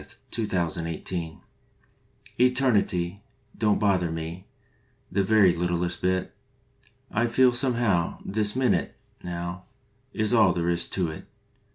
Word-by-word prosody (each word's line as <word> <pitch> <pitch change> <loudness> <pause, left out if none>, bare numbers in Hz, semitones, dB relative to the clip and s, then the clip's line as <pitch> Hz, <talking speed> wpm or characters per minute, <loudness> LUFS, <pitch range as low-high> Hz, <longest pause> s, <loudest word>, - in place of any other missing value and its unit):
March - - -14 0.2
Twenty 110 -3 -2
second 95 - +1
ALL 85 -1 -2
IN 85 +1 -3
ONE 80 - -18 1.1
pTERNITY 100 -8 +1 0.4
Don 105 -1 +2
t - - -2
bother 95 -5 +2
me 80 +2 -6 0.6
The 100 +1 +1
very 100 -3 +4
littlest 85 0 -1
bit. 95 0 0 0.8
I 120 +3 +1
feel 125 +1 +4
somehow 120 -9 +1
This 105 +1 -1
minute, 130 -1 +1 0.3
Now, 85 +1 -5 0.5
Is 110 +1 0
all 105 -6 +5
there 85 -1 -1
is 85 0 0
to 90 -4 -1
it. - - -10
95 Hz, 140 wpm, -26 LUFS, 85-110 Hz, 1.1 s, all